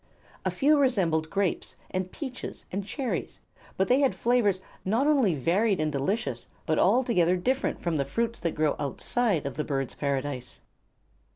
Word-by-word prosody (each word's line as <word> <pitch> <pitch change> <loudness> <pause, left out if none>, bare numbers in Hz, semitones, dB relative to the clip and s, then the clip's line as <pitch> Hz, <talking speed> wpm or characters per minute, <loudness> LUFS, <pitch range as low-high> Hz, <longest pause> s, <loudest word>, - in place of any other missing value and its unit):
A - - +3
few 295 +1 +3
resembled 175 - +2
grapes 195 -1 -1 0.2
and 185 0 -2
peaches 260 -4 -6
and 195 +2 -2
cherries; 255 +5 -3 0.4
but 190 - +2
they 255 +2 +4
had 275 -2 +2
flavors 230 -6 +2 0.2
not 225 +8 +1
only 270 - +3
varied 185 - +2
and 155 -1 0
delicious 140 - -2 0.2
but 155 - +1
altogether 195 -5 +3
different 260 +9 0
from 170 -3 0
the 140 - +1
fruits 230 +12 -1
that 170 - -2
grow 155 -1 +2
outside 180 - 0
of 140 -1 -4
the 150 - 0
Birds' 135 -3 -2
Paradise. 140 -2 -3
185 Hz, 160 wpm, -27 LUFS, 155-240 Hz, 0.4 s, they